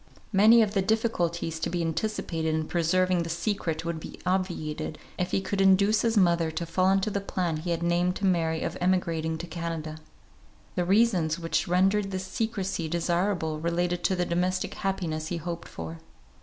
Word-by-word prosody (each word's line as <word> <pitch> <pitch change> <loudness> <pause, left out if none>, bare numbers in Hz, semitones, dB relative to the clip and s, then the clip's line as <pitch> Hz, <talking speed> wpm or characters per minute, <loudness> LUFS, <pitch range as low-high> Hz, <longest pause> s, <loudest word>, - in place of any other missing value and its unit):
Many 220 +4 +7
of 205 -1 -2
the 195 - +2
difficulties 175 -7 0
to 160 - -1
be 175 - -2
anticipated 165 -2 -1
in 155 0 -1
preserving 180 +1 +2
the 165 - -4
secret 170 -2 -2
would 170 -1 -2
be - - -9
obviated, 175 -5 -2 0.2
if 180 0 0
he 195 - 0
could 195 0 -1
induce 200 +2 +4
his 230 -1 +1
mother 170 -4 +3
to 165 +2 -3
fall 185 +3 +2
into 195 +2 +2
the 200 - -1
plan 180 -4 -2
he 165 +3 -5
had 170 0 -1
named 175 +1 +1
to 200 - -2
Mary 165 -3 +1
of 170 - -3
emigrating 165 -3 0
to 170 - -6
Canada. 165 -3 -5 0.7
The 175 - 0
reasons 185 -5 +3
which 165 -1 -1
rendered 195 +3 +2
this 190 -1 -4
secrecy 195 -5 -2
desirable 170 -1 0
related 175 +2 -1
to 190 - +2
the 180 -1 0
domestic 180 +2 -1
happiness 165 -5 -2
he 175 - -2
hoped 170 +1 -5
for. 80 0 -7
175 Hz, 180 wpm, -27 LUFS, 165-190 Hz, 0.7 s, Many